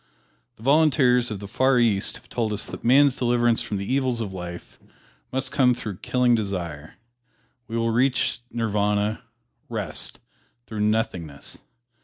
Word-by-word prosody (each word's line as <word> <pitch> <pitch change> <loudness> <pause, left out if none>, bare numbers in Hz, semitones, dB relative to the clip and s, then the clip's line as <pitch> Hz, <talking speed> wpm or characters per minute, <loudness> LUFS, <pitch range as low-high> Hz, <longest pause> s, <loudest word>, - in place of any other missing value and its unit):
The 110 - -16
Volunteers 135 -4 +4
of 105 -3 -5
the 100 - -7
Far 130 +5 +2
East 110 -4 +2
have 115 - -13
told 110 -3 -2
us 105 - -1
that - - -8
man's 135 +2 +5
deliverance 120 -1 +2
from 115 -3 -3
the 100 - -4
evils 130 0 0
of 105 -4 -4
life 90 -1 -8 0.5
must 130 0 -2
come 125 -3 +3
through 105 -6 -6
killing 125 +3 +2
desire; 90 -8 -3 0.7
we 115 0 -3
will 115 0 +1
reach 125 +2 +1
Nirvana 105 -1 0 0.5
rest - - -3 0.5
through 110 -2 -6
nothingness. 100 -9 -2
115 Hz, 145 wpm, -24 LUFS, 100-125 Hz, 0.7 s, man's